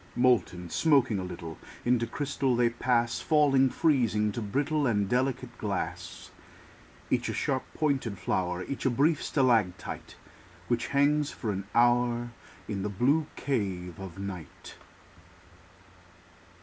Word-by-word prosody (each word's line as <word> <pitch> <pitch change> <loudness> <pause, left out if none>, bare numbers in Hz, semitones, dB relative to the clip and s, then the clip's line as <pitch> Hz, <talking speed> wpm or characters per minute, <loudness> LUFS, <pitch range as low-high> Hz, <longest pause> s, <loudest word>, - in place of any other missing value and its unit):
Molten, 120 -8 +2
smoking 135 - +3
a - - -3
little, 85 -3 -7 0.3
Into 120 -1 +2
crystal 135 0 -1
they 120 -1 +3
pass; 120 0 +1
Falling, 140 -4 +4
freezing, 115 -9 +2
to 115 - -4
brittle 140 +7 0
And 105 -4 +1
delicate 125 +1 -1
glass. 100 -3 -4 0.8
Each - - +1
a - - -2
sharp 130 -2 -2
pointed 135 -9 0
flower, 90 -1 -1
Each 140 - -5
a 130 - +3
brief 145 +5 +2
stalactite 115 - 0 0.5
Which 120 -1 0
hangs 145 +1 +2
for 110 - -4
an 100 0 -4
hour 120 0 +3 0.4
In 100 -3 -3
the 105 - -2
blue 140 +10 +2
cave 95 - -3
of 95 -3 -8
night. 95 -5 -8
120 Hz, 125 wpm, -29 LUFS, 100-135 Hz, 0.8 s, Falling